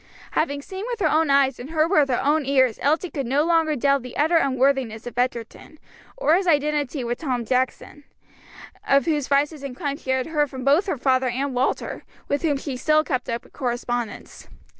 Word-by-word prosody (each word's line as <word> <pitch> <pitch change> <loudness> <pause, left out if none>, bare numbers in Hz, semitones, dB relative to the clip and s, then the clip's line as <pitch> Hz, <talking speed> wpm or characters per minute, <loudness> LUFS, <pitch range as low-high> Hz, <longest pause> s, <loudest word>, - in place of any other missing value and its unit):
Having 285 -2 -1
seen 380 +4 -7
with 485 -2 -4
her 350 - +2
own 315 -1 +2
eyes, 275 -2 +3
and 250 +4 -8
heard 320 +1 +1
with 300 -7 +4
her 250 - +1
own 300 +2 +2
ears, 260 -4 +2
Elsie 315 +5 +1
could 275 -5 -3
no 275 +4 +2
longer 325 -2 +2
doubt 275 +1 +2
the 250 0 -9
utter 320 +4 +3
unworthiness 260 -5 +1
of 240 -1 -7
Egerton, 245 +4 -3 0.4
or - - +2
his 370 +2 +2
identity 295 -3 +1
with 240 0 -3
Tom 255 -6 -2
Jackson; 260 +4 -2 0.8
of 275 0 +4
whose 300 -4 0
vices 285 +1 +1
and 275 -3 -6
crimes 285 -1 -3
she - - -10
had 260 -1 +1
heard 300 -3 0
from 260 -1 -7
both 300 +9 +3
her 340 - -1
father 255 0 +1
and 265 +3 -2
Walter, 250 +2 -2 0.2
with 285 - -1
whom 300 -4 +1
she 275 -1 -5
still 310 +3 +3
kept 255 -5 -3
up 235 0 -3
a - - -19
correspondence. 240 -3 -4
280 Hz, 205 wpm, -23 LUFS, 255-310 Hz, 0.8 s, with